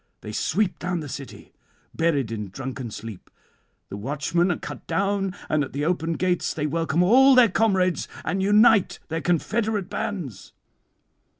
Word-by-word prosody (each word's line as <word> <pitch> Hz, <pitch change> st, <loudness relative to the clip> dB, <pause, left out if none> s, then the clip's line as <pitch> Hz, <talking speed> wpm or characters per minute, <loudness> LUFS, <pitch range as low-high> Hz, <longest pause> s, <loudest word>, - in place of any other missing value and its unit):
They 105 Hz, -, -7 dB
sweep 190 Hz, -, 0 dB
down 175 Hz, -1 st, -2 dB
the 150 Hz, -, -6 dB
city 135 Hz, 0 st, -9 dB, 0.4 s
buried 145 Hz, -8 st, 0 dB
in 105 Hz, -3 st, -4 dB
drunken 130 Hz, +4 st, -6 dB
sleep; 110 Hz, -2 st, -9 dB, 0.6 s
the 100 Hz, -, -6 dB
watchmen 150 Hz, -, 0 dB
are 175 Hz, -, -1 dB
cut -, -, -9 dB
down, 195 Hz, +2 st, 0 dB
and 155 Hz, -1 st, +1 dB
at 135 Hz, -, -7 dB
the 145 Hz, +2 st, -2 dB
open 165 Hz, -1 st, 0 dB
gates 180 Hz, +1 st, -1 dB
they 150 Hz, -, -2 dB
welcome 165 Hz, +2 st, +1 dB
all 260 Hz, +7 st, +6 dB
their 245 Hz, -3 st, +7 dB
comrades, 190 Hz, -3 st, +1 dB, 0.2 s
and 195 Hz, -, -1 dB
unite 210 Hz, +1 st, +4 dB
their 165 Hz, 0 st, -2 dB
confederate 205 Hz, +4 st, -1 dB
bands. 140 Hz, -, -5 dB
170 Hz, 155 wpm, -24 LUFS, 140-195 Hz, 0.6 s, their